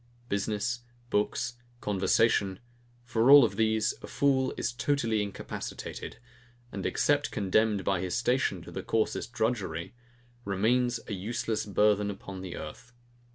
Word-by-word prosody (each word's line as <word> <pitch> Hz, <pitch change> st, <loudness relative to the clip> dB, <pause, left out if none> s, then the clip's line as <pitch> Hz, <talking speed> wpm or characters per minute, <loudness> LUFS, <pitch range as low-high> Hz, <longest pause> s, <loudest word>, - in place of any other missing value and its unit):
Business, 105 Hz, +4 st, -1 dB, 0.3 s
books, 120 Hz, +3 st, 0 dB, 0.2 s
conversation; 100 Hz, -1 st, +2 dB, 0.4 s
for 120 Hz, +1 st, +2 dB
all 145 Hz, 0 st, +11 dB
of 115 Hz, -, +1 dB
these, 110 Hz, -1 st, +2 dB
a -, -, -8 dB
fool 135 Hz, -2 st, +2 dB
is 120 Hz, -, -1 dB
totally 120 Hz, -5 st, +1 dB
incapacitated, 100 Hz, -1 st, -6 dB, 0.5 s
and 95 Hz, -, -3 dB
except 145 Hz, 0 st, +2 dB
condemned 105 Hz, 0 st, +1 dB
by 95 Hz, -3 st, +1 dB
his 90 Hz, -2 st, -1 dB
station 130 Hz, +2 st, +1 dB
to -, -, -10 dB
the -, -, -4 dB
coarsest 115 Hz, +1 st, -1 dB
drudgery, 105 Hz, -9 st, -2 dB, 0.5 s
remains 120 Hz, +5 st, +1 dB
a -, -, -4 dB
useless 110 Hz, +2 st, -2 dB
burthen 105 Hz, 0 st, +3 dB
upon 95 Hz, -1 st, -7 dB
the 90 Hz, -2 st, -6 dB
earth. 120 Hz, +10 st, -9 dB
110 Hz, 130 wpm, -29 LUFS, 100-120 Hz, 0.5 s, all